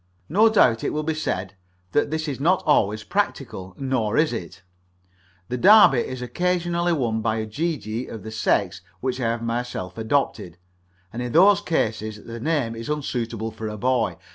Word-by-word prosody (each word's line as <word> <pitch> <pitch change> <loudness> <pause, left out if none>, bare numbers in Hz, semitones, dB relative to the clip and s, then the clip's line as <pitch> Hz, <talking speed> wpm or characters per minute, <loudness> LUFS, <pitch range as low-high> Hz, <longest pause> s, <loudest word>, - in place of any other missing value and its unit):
No 210 +8 +5
doubt 120 - +3
it - - -1
will 155 - -1
be 160 +1 -1
said 95 -11 -3 0.4
that 145 - +1
this 160 +1 -2
is 140 -3 -4
not 175 +6 +2
always 110 -7 +2
practical; 115 - -3
nor 130 -6 -1
is 155 -4 +3
it 95 -3 -7 0.8
the 125 - -3
Derby 200 - +7
is 130 +1 -4
occasionally 175 +4 0
won 120 -8 0
by 110 0 0
a 110 -1 -2
gee 155 +9 -2
gee 110 +2 -5
of 110 -4 -8
the 110 - -7
sex 95 -4 0 0.2
which 130 0 -2
I - - 0
have 115 0 -2
myself 115 -6 -4
adopted, 110 -7 -1 0.6
and 120 - -4
in 125 -1 -4
those 200 +4 +6
cases 110 - -2
the 115 0 -7
name 135 -4 -1
is 115 +3 -7
unsuitable 120 -6 -3
for 110 0 -6
a 105 0 -5
boy. 125 0 0
120 Hz, 180 wpm, -23 LUFS, 110-155 Hz, 0.8 s, Derby